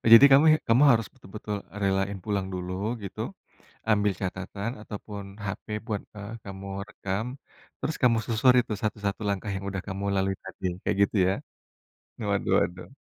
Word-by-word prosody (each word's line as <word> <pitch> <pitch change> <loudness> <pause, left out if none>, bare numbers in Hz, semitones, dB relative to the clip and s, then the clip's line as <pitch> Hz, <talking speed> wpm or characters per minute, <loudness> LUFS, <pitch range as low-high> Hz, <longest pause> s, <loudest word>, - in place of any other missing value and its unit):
Jadi 115 +5 +12
kamu 140 +3 +8 0.2
kamu 120 +5 +6
harus 115 -2 +4
betul-betul 105 -2 -6 0.3
relain 95 0 +1
pulang 100 -3 0
dulu, 90 0 -4 0.3
gitu, 100 - -6 0.7
ambil 105 -1 +4
catatan 95 +4 -3
ataupun 105 -1 -7 0.2
HP 95 - -4 0.2
buat, 105 -4 -2
eee, 105 +2 -7
kamu 100 0 -7 0.2
rekam, 100 +3 -3 0.5
terus 155 - -2
kamu 120 -2 +5
susuri 125 +2 +5
tuh 105 - -2
1-1 105 -1 -1
langkah 100 +1 -1
yang 95 0 -4
udah 95 -1 -3
kamu 95 +1 -4
lalui 95 0 +1
tadi, 95 0 -4 0.2
kayak 105 - 0
gitu, 100 - 0
ya? - - +2 1.0
Waduh - - +1
waduh. 90 +1 -2
100 Hz, 150 wpm, -27 LUFS, 95-110 Hz, 1.0 s, Jadi